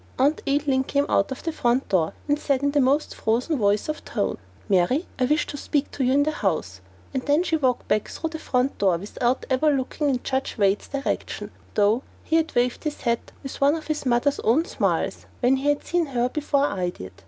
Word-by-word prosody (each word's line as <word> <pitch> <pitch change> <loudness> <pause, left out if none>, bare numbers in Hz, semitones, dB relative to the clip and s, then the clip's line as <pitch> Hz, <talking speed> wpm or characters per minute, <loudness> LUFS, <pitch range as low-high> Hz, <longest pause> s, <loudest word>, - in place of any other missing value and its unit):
Aunt 285 +4 +2
Adeline 275 -2 +2
came 280 +1 +1
out 195 - +2
of 265 - -6
the 330 - -1
front 250 -3 +1
door, 170 -5 +2
and 290 0 +2
said 275 -2 0
in 285 - +2
the 290 0 +3
most 280 +4 +2
frozen 245 +8 0
tone 205 -4 +3
of - - -10 0.3
voice - - 0 0.3
"Mary, 205 - +2
I 255 - +3
wish 300 +3 +2
to 290 - -6
speak 285 0 -1
to 275 - -2
you 255 - +2
in 285 +2 +4
the 305 - 0
house," 155 - -2 0.3
and 265 - -1
then 295 +4 +4 0.2
walked 255 -2 +1
back 215 - +1
through 325 -1 -4
the 320 - -5
front 255 -2 0
door 190 -4 +3
without 240 +7 -1
even 285 +2 +3
looking 275 +3 -1
in 255 -3 -1
Judge 265 -1 -2
Wade's 200 -1 +2
direction, 275 0 -3 0.2
though 210 +4 +3 0.2
he 325 - +2
had 325 0 -1
waved 245 0 +1
his 305 -2 -4
hat 235 -1 -1
with 270 - -7
one 285 +2 +5
of 315 - -6
his 310 -1 -2
mother's 250 +4 +2
own 270 +9 +2
smiles - - -1
when 260 +2 +3
he 280 +2 0
had 290 0 +1
seen 350 -2 0
her 250 -2 0
before 285 0 +1
I 185 -9 -1
did. 95 - -9
265 Hz, 220 wpm, -24 LUFS, 240-290 Hz, 0.3 s, one